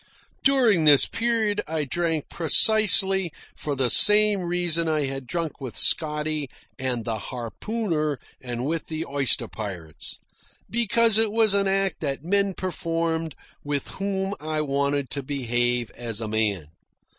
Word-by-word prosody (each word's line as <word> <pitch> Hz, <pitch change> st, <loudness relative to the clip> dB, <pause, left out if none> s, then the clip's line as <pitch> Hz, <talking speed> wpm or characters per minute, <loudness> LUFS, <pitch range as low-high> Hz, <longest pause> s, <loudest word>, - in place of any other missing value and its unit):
During 240 Hz, -, +3 dB
this 145 Hz, -2 st, +7 dB
period 225 Hz, -3 st, 0 dB
I 155 Hz, -1 st, -2 dB
drank 165 Hz, +2 st, -2 dB
precisely 190 Hz, 0 st, +3 dB, 0.2 s
for 145 Hz, -2 st, -4 dB
the 130 Hz, -2 st, +1 dB
same 210 Hz, -1 st, +6 dB
reason 175 Hz, -2 st, -1 dB
I 155 Hz, -2 st, 0 dB
had 135 Hz, -1 st, -6 dB
drunk 165 Hz, 0 st, -4 dB
with 130 Hz, -5 st, -7 dB
Scotty 150 Hz, -2 st, +1 dB, 0.3 s
and 125 Hz, -4 st, -2 dB
the 110 Hz, -2 st, -3 dB
harpooner 155 Hz, -, -3 dB, 0.2 s
and 125 Hz, -1 st, -4 dB
with 160 Hz, +2 st, -2 dB
the 160 Hz, 0 st, -4 dB
oyster 135 Hz, -3 st, 0 dB
pirates 90 Hz, -9 st, -6 dB, 0.5 s
because 230 Hz, -1 st, +3 dB
it 225 Hz, -2 st, +2 dB
was 220 Hz, -2 st, +4 dB
an 200 Hz, -1 st, +2 dB
act 195 Hz, -2 st, 0 dB
that 140 Hz, -1 st, -4 dB
men 200 Hz, +1 st, +1 dB
performed 165 Hz, -3 st, -3 dB, 0.3 s
with 145 Hz, -1 st, -3 dB
whom 195 Hz, 0 st, -3 dB
I 155 Hz, 0 st, -2 dB
wanted 140 Hz, -1 st, -1 dB
to 140 Hz, -, -2 dB
behave 120 Hz, -3 st, -1 dB
as 115 Hz, -3 st, -5 dB
a 110 Hz, -, -4 dB
man. 105 Hz, -7 st, -1 dB
155 Hz, 140 wpm, -24 LUFS, 135-195 Hz, 0.5 s, this